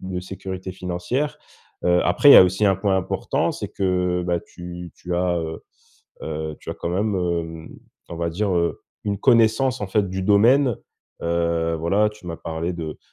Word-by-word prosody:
de 95 -1 -4
sécurité 95 0 -7
financière. 90 +10 -3 0.5
Heu, 90 0 +4
après, 90 +11 +5
il - - +12
y - - +11
a - - +11
aussi 95 +3 +2
un 95 - +4
point 95 0 +1
important, 95 - -1
c'est - - -5
que, 90 -2 0
bah, 85 -1 0
tu 90 0 -9
tu 90 0 -5
as, 90 0 +1
heu, 80 -1 -5 0.6
heu, 80 0 -4
tu - - -13
as - - -4
quand 85 - -4
même, 100 +4 0
hem, 85 -2 -3 0.4
on 85 - -6
va 85 0 -1
dire, 100 +5 -1
heu, 85 -1 0 0.2
une 100 -1 -1
connaissance 115 +4 +3
en 105 - -2
fait 100 +1 +1
du 95 +1 -3
domaine. 115 +5 +4 0.5
Heu, 85 -1 0
voilà, 100 +6 +2
tu 105 -3 -15
m'as 85 -1 -5
parlé 80 +2 -4
de, 80 -3 -6
90 Hz, 185 wpm, -22 LUFS, 85-100 Hz, 0.6 s, il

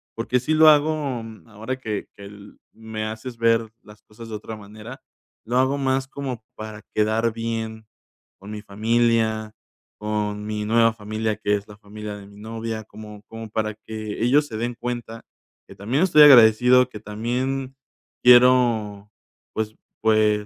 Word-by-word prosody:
porque 120 +2 0
sí 150 +6 -1
lo 155 0 +8
hago, 150 -4 +2
mm 110 0 -12
ahora 110 +5 -5
que 110 -6 -5
que 100 - -13
el 100 0 -13 0.2
me 110 -1 -6
haces 110 +3 -7
ver 115 -1 +2
las 105 0 -16
cosas 115 +1 -12
de 110 - -5
otra 110 +1 -7
manera, 110 +5 -11 0.4
lo 120 +2 -1
hago 130 +2 +2
más 135 -1 0
como 135 -4 -6
para 110 -1 -8
quedar 110 +2 +1
bien 110 -1 -4 0.5
con 100 +2 -10
mi 105 -1 -6
familia, 110 0 0 0.5
con 105 -1 -3
mi 105 0 -3
nueva 115 +1 +3
familia, 110 0 -3
que 105 - +1
es 100 0 -6
la 105 - -12
familia 105 0 -8
de 100 -1 -12
mi 100 0 -16
novia, 110 0 -5
como 105 -1 -11
como 115 -1 -9
para 110 0 -2
que 110 0 -6
ellos 145 +4 +3
se 110 - -8
den 120 +2 -3
cuenta 120 -1 -6 0.4
que - - -13
también 120 - 0
estoy 155 -5 +5
agradecido, 125 -1 +7
que 105 -4 -9
también 130 +5 -3 0.5
quiero, 120 -5 +4 0.4
pues 110 0 -3 0.3
pues, 110 -1 +3
110 Hz, 160 wpm, -23 LUFS, 105-120 Hz, 0.5 s, lo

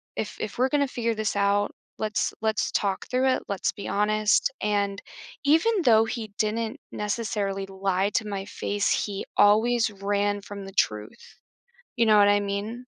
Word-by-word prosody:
if - - -4
if - - -5
we're 260 +2 +2
gonna 285 -2 +2
figure 230 -3 -2
this 215 -1 -2
out, 200 0 +1 0.2
let's 215 -1 -1
let's 220 -1 0
talk 195 -2 -1
through 255 +1 +2
it, 260 - +1
let's 200 - -1
be 200 - -7
honest," 215 +4 +2
and 200 -1 0 0.4
even 340 +8 +3
though 225 -3 +5
he 225 -2 -5
didn't 220 +1 -1
necessarily 205 -2 -2
lie 195 0 0
to 220 - -1
my 195 -1 -4
face, 205 0 -2 0.2
he 200 -2 -5
always 225 +3 +4
ran 205 0 -1
from 200 0 -8
the 195 - -9
truth, 105 - -2 0.6
you 235 -1 +3
know 215 -1 +5
what? 205 - +6
I 205 - +4
mean, 205 +5 -4
210 Hz, 165 wpm, -26 LUFS, 200-225 Hz, 0.6 s, what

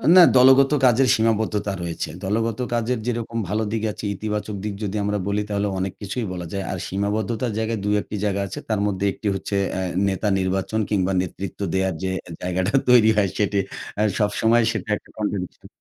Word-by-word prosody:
না, 185 - +10
দলগত 130 +2 +7
কাজের 130 +2 +4
সীমাবদ্ধতা 110 -2 0
রয়েছে। 85 -2 -4
দলগত 110 +3 -1
কাজের 120 +1 0
যেরকম 115 -1 -2
ভালো 110 +2 0
দিক 110 -1 -2
আছে, - - -10
ইতিবাচক 105 0 -3
দিক 105 - -3
যদি 100 0 -3
আমরা 105 0 0
বলি, 100 +1 0
তাহলে 100 0 0
অনেক 95 0 -2
কিছুই 110 +4 -3
বলা 90 -1 -5
যায়। 100 -1 -2
আর 95 - -3
সীমাবদ্ধতার 105 +4 -1
জায়গায় 110 0 -1
২ 105 - +2
১ - - -13
টি - - -2
জায়গা 100 -1 0
আছে। 95 - -6
তার 110 -2 +1
মধ্যে 100 -1 -1
১ - - -11
টি 110 - -2
হচ্ছে, 95 +1 -3 0.2
অ্যা 95 - -2 0.3
নেতা 95 +2 -1
নির্বাচন 95 +3 -1
কিংবা 95 -2 +1
নেতৃত্ব 95 +2 -6
দেওয়ার 95 -1 +1
যে 95 - 0 0.3
জায়গাটা 90 +3 -1 0.2
তৈরি 120 -3 +7
হয়, 100 -2 +3
সেটি 105 -1 +1 0.4
অ্যা 105 - +2 0.2
সবসময় 110 +2 +3
সেটা 110 -3 -5
একটা - - -20
কন্ট্রিবিউশন 100 -4 -4
105 Hz, 190 wpm, -23 LUFS, 95-110 Hz, 0.4 s, না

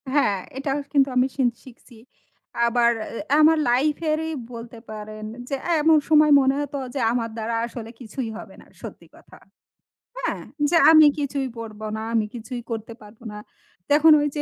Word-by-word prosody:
হ্যাঁ, 210 -9 +2 0.2
এটাও 275 0 -2 0.2
কিন্তু 275 -2 +4
আমি 250 +1 +3
শিন 265 -3 +2 0.2
শিখছি। 245 -1 -16 0.7
আবার 235 0 +3 0.4
আ - - +6
আমার 320 +1 +6
লাইফ 275 +5 +2 0.2
এরই 320 +1 -1 0.2
বলতে 230 0 -9
পারেন 215 0 -8 0.2
যে 275 - -1
এ্যা 345 - 0
এমন 320 +1 +5
সময় 305 -1 +5
মনে 265 0 +2
হতো 285 0 -5 0.2
যে 280 - -3
আমার 230 -1 -1
দ্বারা 225 +1 -3
আসলে 235 -1 -8
কিছুই 240 0 -6
হবে - - -11
না - - -18 0.2
সত্যি - - -10
কথা। - - -17 0.8
হ্যাঁ, - - -3 0.3
যে 340 - +3
আমি 310 -1 +8
কিছুই 280 -1 -2
পড়বো 215 -1 -8
না, - - -5
আমি 225 -2 +2
কিছুই 240 +1 -6
করতে 225 0 -5
পারবো 210 +2 -16
না। 210 - -8 0.5
তখন 305 +2 +6
ঐ - - 0
যে 295 - -1
250 Hz, 175 wpm, -23 LUFS, 230-290 Hz, 0.8 s, আমি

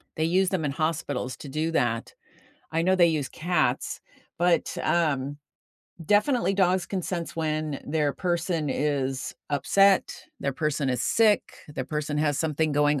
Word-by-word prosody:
they 160 - -1
use 185 +3 +2
them 185 -4 -1
in 145 - 0
hospitals 155 -4 -2
to 145 - -9
do 155 +4 -1
that. 120 -7 0 0.6
I 165 +1 +1
know 185 +2 +3
they 175 -2 +6
use 155 -4 0
cats, 155 -7 -1 0.4
but, 175 -1 +2
um, 145 -4 +1 0.7
definitely 210 - +2
dogs 185 -2 +2
can 195 - -2
sense 170 -1 -4
when 155 -2 -2
their 150 -1 +1
person 175 -3 -1
is 135 -2 -1 0.2
upset, 195 +7 +3 0.2
their 140 - -1
person 150 0 -1
is 125 -1 -1
sick, 215 - +4 0.3
their 150 - -4
person 150 -1 -2
has 145 -2 +1
something 155 0 0
going 145 0 +2
155 Hz, 150 wpm, -26 LUFS, 145-175 Hz, 0.7 s, they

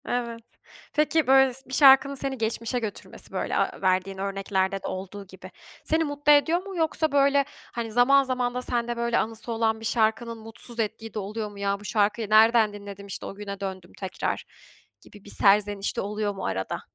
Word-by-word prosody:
Evet. 235 -1 -3 0.5
Peki 305 0 +2
böyle 265 -1 +5
s 265 +2 -6
bir - - -8
şarkının 275 0 +6
seni 270 0 -3
geçmişe 230 +1 -2
götürmesi 215 -4 -8
böyle - - -2
aaa - - -1
verdiğin 190 0 +1
örneklerde 195 0 -1
de - - -3
olduğu 195 +1 -6
gibi 190 - -12 0.3
seni 320 +1 +1
mutlu 290 -1 +1
ediyor 320 +4 +4
mu 390 - -7
yoksa, 320 -1 0
böyle, 280 0 +3 0.3
hani, 230 -1 -4
zaman 260 +4 +5
zaman 250 -2 -1
da 250 - -3
sende 240 -1 -2
böyle 235 0 0
anısı 225 +1 -3
olan 225 -1 0
bir 225 - -8
şarkının 230 +1 0
mutsuz 225 +2 -11
ettiği 225 0 -3
de 215 - -3
oluyor 210 +2 -4
mu? 200 - -12
Ya, 200 0 -1
bu 205 - -13
şarkıyı 210 0 0
nereden 220 0 +5
dinledim 200 -1 -9
işte 195 - -6
o - - -7
güne 200 -1 -7
döndüm, 190 -3 -6
tekrar 190 -2 -3 0.6
gibi 205 -1 -16
bir - - -11
serzeniş 205 0 +2
de - - +1
oluyor 210 0 -2
mu 195 - -5
arada? 95 0 -3
225 Hz, 190 wpm, -26 LUFS, 200-250 Hz, 0.6 s, şarkının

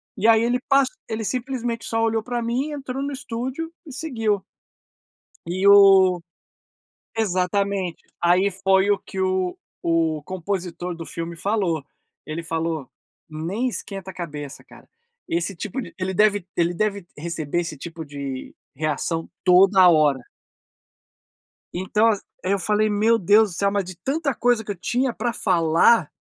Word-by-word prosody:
E 220 +1 +1
aí 225 0 +6
ele 245 +1 +1
pas 275 -1 +5 0.2
ele 220 0 -3
simplesmente 245 -1 -3
só 225 0 0
olhou 225 -1 +1
para 240 +1 -3
mim, 250 +6 -1
entrou 270 -2 -5
no 280 +1 -2
estúdio 265 +4 -4
e 300 - -10
seguiu. 225 -9 -1 1.0
E 185 +3 -1
o 195 -3 +7 1.0
exatamente. 195 -2 -1 0.2
Aí 180 +3 +4
foi 190 +1 +2
o 200 - +3
que 190 - -7
o 185 -1 0 0.2
o 165 -2 +1
compositor 180 -1 -4
do 165 -1 -8
filme 170 0 -5
falou, 185 -5 -1 0.4
ele 155 +2 -4
falou: 160 -4 -3 0.4
"Nem 175 +11 -2
esquenta 195 -5 -6
a - - -12
cabeça 150 -5 -7
cara, - - -17 0.4
esse 170 +4 -1
tipo 250 - -4
de 245 - -9
ele 190 0 -2
deve 205 -1 +3
ele 170 0 +1
deve 200 -1 -1
receber 165 0 -2
esse 165 -3 -5
tipo 165 +1 -7
de 140 -3 -6 0.2
reação 155 +2 -2 0.2
toda 185 0 +6
hora". 155 -5 +4 1.6
Então 210 +5 +2
as 210 -3 +1 0.2
aí 185 - +1
eu 200 - +2
falei: 210 +3 +1
"Meu 220 +3 +3
Deus 205 +2 +4
do - - -8
céu, 200 +1 +2
mas 200 -1 0
de 185 0 -9
tanta 280 - -1
coisa 240 -1 +2
que 210 - -7
eu - - -11
tinha 245 +8 0
para 240 - -1
falar" 170 -1 +3
195 Hz, 155 wpm, -23 LUFS, 170-225 Hz, 1.6 s, o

